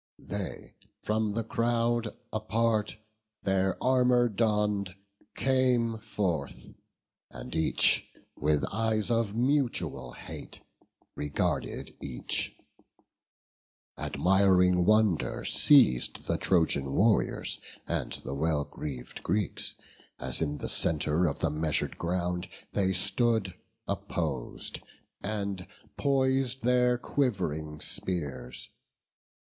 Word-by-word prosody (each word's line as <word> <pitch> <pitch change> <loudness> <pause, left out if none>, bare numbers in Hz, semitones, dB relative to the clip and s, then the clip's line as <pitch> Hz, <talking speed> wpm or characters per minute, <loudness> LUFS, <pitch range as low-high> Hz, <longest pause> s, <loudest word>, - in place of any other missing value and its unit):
They, - - -6 0.3
from 110 -1 0
the 115 +2 -1
crowd 115 0 0 0.2
apart 110 0 0 0.5
their 95 -1 +1
armour 125 -1 +4
donn'd, 105 -3 0 0.4
Came 125 -4 +2
forth: 95 -9 -3 0.6
and - - -8
each, 80 -1 +3 0.3
with 75 -2 +1
eyes 110 +1 0
of 115 -3 +1
mutual 120 - 0
hate, - - -8 0.5
Regarded 75 0 -2
each: 65 -3 -2 1.4
admiring 90 -1 +3
wonder 110 -5 +2
seiz'd 130 - +4
The - - 0
Trojan 80 -7 +2
warriors 110 +2 +2 0.3
and - - -2
the 65 - -4
well 75 0 0
greav'd 65 -5 -7
Greeks, 100 +2 0 0.4
As - - -1
in 75 -2 -1
the - - -4
centre 80 +2 +3
of 70 - -3
the - - +1
measur'd 75 0 0
ground 90 +1 -1 0.2
They 95 -2 +2
stood 110 +1 +1 0.3
oppos'd, 70 -8 -3 0.4
and 100 -3 -3 0.3
pois'd 130 -2 +1
their 125 0 +3
quiv'ring 85 - -1
spears. 70 -9 -3
100 Hz, 95 wpm, -29 LUFS, 80-115 Hz, 1.4 s, armour